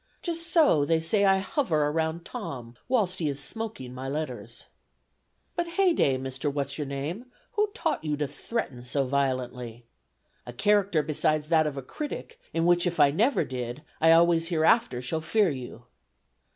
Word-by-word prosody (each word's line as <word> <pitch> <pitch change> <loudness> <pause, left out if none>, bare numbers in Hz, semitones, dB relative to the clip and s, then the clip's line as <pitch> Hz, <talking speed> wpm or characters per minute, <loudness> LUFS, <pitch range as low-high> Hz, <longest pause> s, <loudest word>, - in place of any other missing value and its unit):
Just 335 -1 -2
so 305 - +4
they 160 +2 +2
say 200 +5 +2
I 195 0 +5
hover 170 - 0
round 160 +1 -2
Tom, 130 - -7
whilst 210 -8 +1
he 155 -3 0
is 140 0 -3
smoking 210 - -5
my 130 +1 -5
letters. 125 -7 -5 0.9
"But 345 0 -1
heyday, 335 - +3
Mr. 130 +2 -3
What's 140 +1 -3
your 145 - -2
name, 145 - -4 0.3
who 420 0 +1
taught 470 - -1
you 150 -2 -1
to 145 -1 -1
threaten 140 - -4
so 135 +2 0
violently? 125 -3 -2 0.6
'A 120 - -7
character 195 +1 +2
besides 155 0 0
that 160 -2 +4
of 145 -2 -4
a 135 - -4
critic, 305 - -6
in 165 0 0
which 175 0 +4
if 175 -1 -3
I 145 -1 +6
never 225 - +2
did, 125 0 -5 0.2
I 165 0 +6
always 165 0 +5
hereafter 165 - +2
shall 160 +5 -2
fear 200 +5 +2
you.' 125 -3 -8
155 Hz, 165 wpm, -27 LUFS, 135-195 Hz, 0.9 s, I